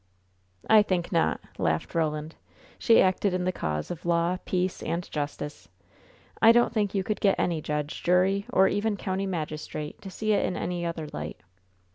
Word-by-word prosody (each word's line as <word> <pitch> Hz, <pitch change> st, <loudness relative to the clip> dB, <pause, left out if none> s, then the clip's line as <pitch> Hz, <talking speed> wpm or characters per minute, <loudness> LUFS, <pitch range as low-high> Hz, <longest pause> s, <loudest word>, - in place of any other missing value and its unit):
"I 220 Hz, -1 st, +7 dB
think 185 Hz, -4 st, -1 dB
not," 165 Hz, -3 st, +2 dB, 0.2 s
laughed 80 Hz, -1 st, 0 dB
Roland. 155 Hz, -1 st, -1 dB, 0.5 s
"She 230 Hz, -, +5 dB
acted 185 Hz, 0 st, +1 dB
in 180 Hz, -, -1 dB
the 185 Hz, -, +1 dB
cause 75 Hz, -, -3 dB
of 175 Hz, -, -6 dB
law, 170 Hz, +1 st, +1 dB
peace 185 Hz, 0 st, -1 dB
and 170 Hz, +1 st, -3 dB
justice. 145 Hz, -, -5 dB, 0.7 s
I 225 Hz, -, +9 dB
don't 240 Hz, 0 st, +3 dB
think 210 Hz, -3 st, 0 dB
you 195 Hz, -, +1 dB
could 210 Hz, +2 st, -3 dB
get 195 Hz, -2 st, +3 dB
any 170 Hz, -3 st, 0 dB
judge, 150 Hz, 0 st, -3 dB
jury, 190 Hz, +3 st, +2 dB
or 190 Hz, +1 st, +5 dB
even 205 Hz, +1 st, 0 dB
country 190 Hz, +1 st, -2 dB
magistrate, 155 Hz, -3 st, -5 dB
to 195 Hz, -, -8 dB
see 215 Hz, +3 st, -1 dB
it -, -, +2 dB
in 180 Hz, -, -1 dB
any 175 Hz, -1 st, -3 dB
other 165 Hz, -2 st, -4 dB
light." 75 Hz, +1 st, -6 dB
180 Hz, 175 wpm, -27 LUFS, 155-195 Hz, 0.7 s, I